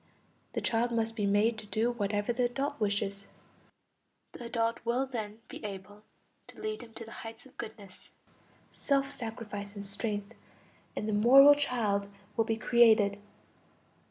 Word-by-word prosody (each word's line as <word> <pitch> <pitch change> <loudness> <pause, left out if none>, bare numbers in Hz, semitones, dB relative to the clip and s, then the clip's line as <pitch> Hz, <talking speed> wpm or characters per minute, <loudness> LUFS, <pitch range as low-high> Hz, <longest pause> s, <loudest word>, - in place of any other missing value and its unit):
The - - -2
child 235 +1 +1
must 225 -1 0
be 205 -3 0
made 215 +3 +2
to 215 - -10
do 220 +4 +1
whatever 205 0 -1
the 245 +1 +1
adult 275 +4 -2
wishes; 200 -1 -1 1.0
the 240 - -9
adult 230 0 0
will 240 +3 +1
then 220 -5 -5
be - - -9
able 205 0 -7 0.5
to - - -14
lead 430 0 -3
him 230 - -12
to 230 - -7
the 225 - -12
heights 225 +3 -9
of 265 - -18
goodness, 205 -3 -10 0.6
self 275 -1 0
sacrifice 215 -3 -6
and 200 0 -6
strength, 205 0 -3 0.6
and 215 - -3
the 215 - 0
moral 265 +7 +8
child 230 -8 0 0.3
will 225 - +2
be 225 -1 -1
created. 220 -3 +4
225 Hz, 155 wpm, -31 LUFS, 205-240 Hz, 1.0 s, moral